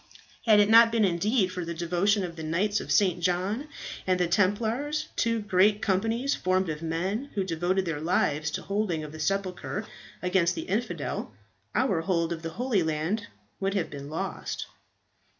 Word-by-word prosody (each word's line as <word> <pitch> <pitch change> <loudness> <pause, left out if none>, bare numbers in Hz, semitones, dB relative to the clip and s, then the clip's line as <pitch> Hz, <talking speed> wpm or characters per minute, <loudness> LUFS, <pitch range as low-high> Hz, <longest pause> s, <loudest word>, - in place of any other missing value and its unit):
Had 215 -2 +7
it 205 - +5
not 230 +1 +7
been 225 -2 +3
indeed 190 +3 +1
for 180 -1 -4
the 170 0 -5
devotion 180 +4 +1
of 170 -2 -5
the 160 - -7
Knights 185 +7 0
of - - -6
St. 185 -5 +3
John 185 - 0 0.4
and 185 -1 +2
of 180 - +3
the 170 - -2
Templars, 235 +11 +1
two 230 -1 +1
great 205 +1 +3
companies 225 +7 +1
formed 185 -1 +1
of 155 0 -4
men 185 - -2
who 195 - +1
devoted 185 +2 0
their 160 -3 -3
lives 150 -2 +1
to - - -4
the - - -15
holding 195 -5 -1
of 150 - -7
the 155 - -9
sepulchre 195 +4 -2 0.4
against 180 -1 +2
the - - -4
infidel, 220 +6 -3 0.4
our 200 -11 +2
hold 170 -1 0
of 165 - -7
the 165 - -4
Holy 230 +2 0
Land 160 +7 -1 0.3
would 195 +1 -1
have 185 -5 -1
been 140 0 -7
lost. 155 - -4
185 Hz, 185 wpm, -27 LUFS, 170-210 Hz, 0.4 s, Had